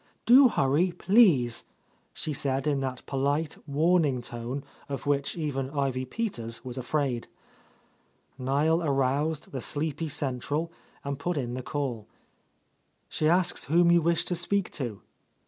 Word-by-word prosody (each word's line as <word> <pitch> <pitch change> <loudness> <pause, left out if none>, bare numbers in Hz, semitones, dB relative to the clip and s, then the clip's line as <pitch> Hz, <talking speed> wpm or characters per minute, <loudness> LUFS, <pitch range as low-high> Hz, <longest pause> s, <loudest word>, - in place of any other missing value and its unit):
"Do 260 +3 +8
hurry, 155 - +2
please," 170 - +4 0.5
she 155 - -4
said 135 -1 -1
in 145 -2 +1
that 130 -2 -4
polite, 145 +3 -1
warn 165 +5 +3
ing 130 -4 0
tone 120 +4 -5 0.3
of 140 - -5
which 145 +2 0
even 135 -4 -2
Ivy 135 -3 -1
Peters 125 - -4
was 125 -1 -6
afraid. 130 -2 -1 1.1
Niel 145 +6 +2
aroused 145 +1 0
the 130 - -4
sleepy 155 +3 -2
central 145 +4 -2 0.3
and 140 -1 -4
put 175 +3 -2
in 120 -3 -2
the 130 - -4
call. 125 -6 -4 1.0
"She 155 - +1
asks 175 0 +3
whom 170 +3 +4
you 170 0 +5
wish 170 +1 +1
to - - -1
speak 180 +3 0
to?" 120 -9 -5
145 Hz, 140 wpm, -28 LUFS, 130-165 Hz, 1.1 s, Do